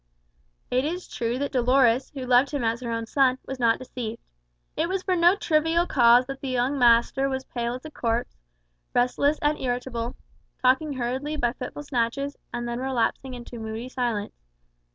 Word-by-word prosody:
It 255 +1 +2
is 350 +5 -3
true 235 +1 -2
that 285 +1 -2
Dolores, 250 -1 +3
who 270 -3 -6
loved 250 +2 +4
him 280 -3 -2
as 230 +2 0
her 240 - -4
own 230 0 -2
son, 260 +2 +2
was 265 -1 -6
not 230 -2 +3
deceived. 240 -3 -6 0.6
It 335 - 0
was 380 0 -1
for 370 - +1
no 345 +2 +5
trivial 325 -1 +2
cause 245 -4 +5
that 270 +1 -7
the 275 - -4
young 255 +3 0
master 240 +3 +4
was 265 0 -3
pale 240 -1 -3
as 255 - -10
a 310 - -7
corpse, 235 -3 -2 0.6
restless 280 +5 +2
and 295 +1 +2
irritable, 245 -1 -3 0.4
talking 265 +4 +2
hurriedly 260 +4 -2
by 240 -5 0
fitful 260 +3 -7
snatches, 275 +1 -1 0.2
and 240 0 -3
then 235 0 -3
relapsing 260 0 -1
into 240 -1 -9
moody 220 +3 -5
silence. 240 -5 -2
255 Hz, 175 wpm, -25 LUFS, 240-280 Hz, 0.6 s, no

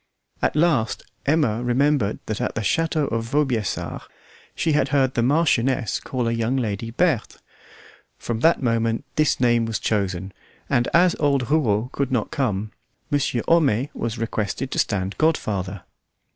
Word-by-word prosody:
At - - +1
last 150 -10 +1 0.2
Emma 135 -7 +2
remembered 125 -3 +1
that 110 - -3
at - - -2
the 115 - -1
château 160 +5 +1
of 115 0 -1
Vaubyessard 130 - -1 0.5
she 165 - 0
had 150 - +2
heard 135 -3 +2
the 120 - +1
Marchioness 130 - +2
call 125 -3 -3
a - - +1
young 115 +2 0
lady 115 -2 -2
Berthe; 140 -1 0 0.8
from 115 -2 -3
that 160 +2 +3
moment 115 -1 0
this 155 -1 +2
name 120 -2 +3
was 110 -2 -1
chosen; 95 -3 -2 0.3
and 120 -1 +1
as 180 +1 +4
old 140 -4 +1
Rouault 120 -7 +2
could 140 -2 -2
not 120 -4 -1
come, 110 -6 -1 0.4
Monsieur 140 -4 0
Homais 140 -6 +3
was 115 0 -3
requested 115 +3 -3
to - - -1
stand 95 -2 -1
godfather. 100 - 0
120 Hz, 150 wpm, -23 LUFS, 110-145 Hz, 0.8 s, as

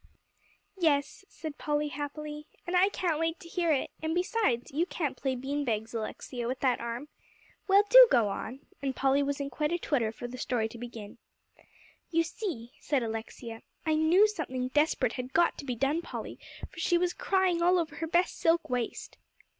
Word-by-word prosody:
"Yes," 305 +2 +1
said 310 -3 -8
Polly 295 0 0
happily, 295 +2 -6 0.2
"and 355 +1 -2
I 370 +2 +5
can't 340 -6 -1
wait 330 +1 -1
to 355 - -12
hear 340 -1 0
it; 280 - 0
and 315 +1 -1
besides, 360 - 0
you 325 +6 0
can't 305 -7 -2
play 265 0 -1
bean 275 +3 -2
bags, 225 -2 -2
Alexia, 235 +2 -4
with 255 +1 -2
that 255 -3 +2
arm. 235 +4 -4 0.6
Well, 395 +1 +6
do - - +10
go 230 -4 +4
on," 240 +6 -5 0.2
and 270 -2 -2
Polly 270 +1 +3
was 280 0 -1
in 280 0 -3
quite 300 +4 -1
a 345 - +1
twitter 250 -10 0
for 240 +2 -7
the 250 +1 -8
story 240 -4 0
to 235 - -10
begin. 230 -4 -8 0.9
"You 330 0 +2
see," 330 - -5
said 280 -4 0
Alexia, 225 +1 -6 0.2
"I 315 - +2
knew 325 +7 +5
something 260 -10 -3
desperate 295 -4 +2
had 255 +1 -6
got 340 0 +4
to - - -6
be 250 -3 -2
done, 275 +7 +1
Polly, - - -7 0.3
for - - -13
she 350 - +3
was 355 0 +1
crying 375 -3 +1
all 355 +2 +4
over 320 -3 -2
her 325 - -3
best 350 +3 +1
silk 330 -4 +2
waist." 245 -2 -3
290 Hz, 190 wpm, -30 LUFS, 250-340 Hz, 0.9 s, do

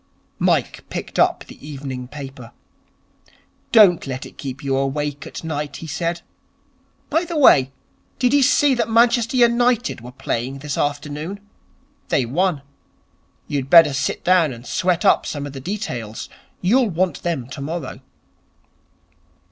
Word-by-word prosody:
Mike - - +1
picked - - -5
up - - +3
the - - -15
evening 135 -4 -6
paper. 135 -4 -10 1.2
'Don't 195 -9 +6
let 130 0 -5
it - - -13
keep 135 +1 -7
you 135 -1 0
awake 140 +1 -2
at - - -8
night,' 150 -2 -4
he - - -8
said. 170 +2 -3 0.9
'By 325 +4 +2
the 340 -2 -4
way, 135 - +6 0.5
did 250 0 +2
you 285 - +5
see 285 +1 +4
that 240 -2 -1
Manchester 235 +2 +3
United 240 - +2
were 125 +1 -10
playing 125 +1 -3
this 145 0 -4
afternoon? 150 +6 -3 0.7
They 130 - +2
won. 155 +3 0 0.8
You'd 135 -2 -3
better 165 -4 +7
sit 135 0 -2
down 180 -5 +4
and 120 -1 -10
sweat 180 -2 0
up - - +4
some 145 -1 -4
of 145 - -7
the 135 - -7
details. 130 - -5 0.3
You'll 235 +6 +3
want 180 +1 -1
them 165 -8 -2
tomorrow.' 155 +5 -6
150 Hz, 140 wpm, -21 LUFS, 135-200 Hz, 1.2 s, better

